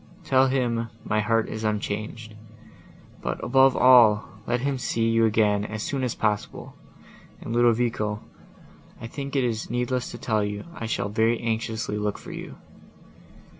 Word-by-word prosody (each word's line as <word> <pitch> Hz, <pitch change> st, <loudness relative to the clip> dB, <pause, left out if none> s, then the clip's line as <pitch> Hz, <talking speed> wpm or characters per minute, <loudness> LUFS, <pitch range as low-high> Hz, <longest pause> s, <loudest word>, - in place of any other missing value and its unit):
Tell 130 Hz, 0 st, +4 dB
him, 120 Hz, -3 st, 0 dB
my 110 Hz, -, 0 dB
heart 115 Hz, +1 st, +1 dB
is 110 Hz, 0 st, -5 dB
unchanged. 110 Hz, +1 st, -3 dB, 0.9 s
But, -, -, -3 dB
above 135 Hz, +1 st, +4 dB
all, 120 Hz, -5 st, +6 dB, 0.2 s
let 120 Hz, 0 st, 0 dB
him 135 Hz, 0 st, -1 dB
see 115 Hz, -2 st, 0 dB
you 115 Hz, 0 st, +3 dB
again 105 Hz, -2 st, +2 dB
as 105 Hz, 0 st, -5 dB
soon 135 Hz, -2 st, -2 dB
as 125 Hz, -, -1 dB
possible; 105 Hz, -2 st, -2 dB, 0.7 s
and, 115 Hz, -, -6 dB
Ludovico, 115 Hz, -3 st, +1 dB, 0.8 s
I -, -, -7 dB
think 140 Hz, +4 st, -6 dB
it 135 Hz, -, +2 dB
is 115 Hz, -3 st, -2 dB
needless 125 Hz, +1 st, -1 dB
to -, -, -8 dB
tell 110 Hz, -3 st, 0 dB
you 105 Hz, 0 st, -4 dB
I 115 Hz, -, -5 dB
shall 105 Hz, -, -2 dB
very 110 Hz, +2 st, +1 dB
anxiously 110 Hz, -2 st, -2 dB
look 105 Hz, 0 st, -2 dB
for -, -, -10 dB
you." -, -, -8 dB
115 Hz, 155 wpm, -25 LUFS, 110-125 Hz, 0.9 s, all